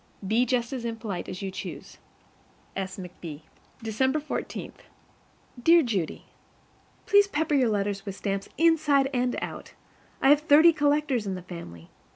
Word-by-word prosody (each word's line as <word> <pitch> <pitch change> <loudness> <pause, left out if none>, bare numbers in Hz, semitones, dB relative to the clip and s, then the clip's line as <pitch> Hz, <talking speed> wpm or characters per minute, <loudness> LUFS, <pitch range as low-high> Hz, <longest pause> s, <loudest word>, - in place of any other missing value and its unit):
Be 235 +5 +2
just 240 -1 0
as 255 -3 -4
impolite 225 -5 -4
as 185 +2 -6
you 195 - -3
choose. 195 - -8 0.8
S. 190 -1 -4
McB. 175 -5 -8 0.4
December 260 +7 +1
14. 300 - -5 0.9
Dear 335 +5 +6
Judy: 200 - -2 0.8
PLEASE 405 -1 +5
pepper 320 -4 -1
your 260 -5 +3
letters 200 -1 -1
with 195 -2 -6
stamps, 195 -1 -3
inside 295 -4 +3
and 250 -1 0
out. - - -7 0.5
I 270 - +4
have 295 +1 +6
thirty 315 +2 +6
collectors 290 -6 +1
in 190 - -2
the 180 - -8
family. 125 - -10
240 Hz, 145 wpm, -27 LUFS, 195-295 Hz, 0.9 s, Dear